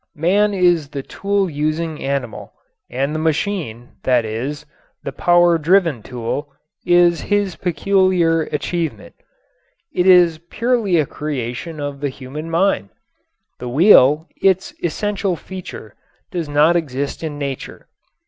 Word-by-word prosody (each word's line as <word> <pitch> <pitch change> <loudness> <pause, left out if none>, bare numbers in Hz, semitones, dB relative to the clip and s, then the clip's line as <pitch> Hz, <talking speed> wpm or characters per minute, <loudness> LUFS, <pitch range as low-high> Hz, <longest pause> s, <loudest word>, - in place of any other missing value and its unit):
Man 200 +7 +2
is 175 -6 +2
the 140 -2 -6
tool 200 +3 -1
using 155 +1 -2
animal, 135 -4 -4 0.4
and 135 +4 -2
the 155 - -2
machine, 155 - -2
that 125 -3 +2
is, 125 +7 -4 0.4
the - - -4
power 175 -1 +3
driven 165 - +2
tool, 125 +5 -5 0.4
is 175 -1 +4
his 205 -3 0
peculiar 180 -1 +2
achievement. 165 +2 -3 0.8
It 180 +1 +1
is 175 -3 +6
purely 230 -6 +1
a 155 - +2
creation 150 +2 -5
of 145 -1 -5
the 145 0 -2
human 140 +5 -8
mind. 165 - +1 0.7
The 125 - -5
wheel, 150 - +5
its 190 -1 +2
essential 195 +2 -1
feature, 180 - -9 0.4
does 170 -4 -4
not 150 +4 +4
exist 140 -4 -2
in 150 -2 -4
nature. 140 -2 -6
160 Hz, 125 wpm, -19 LUFS, 140-180 Hz, 0.8 s, is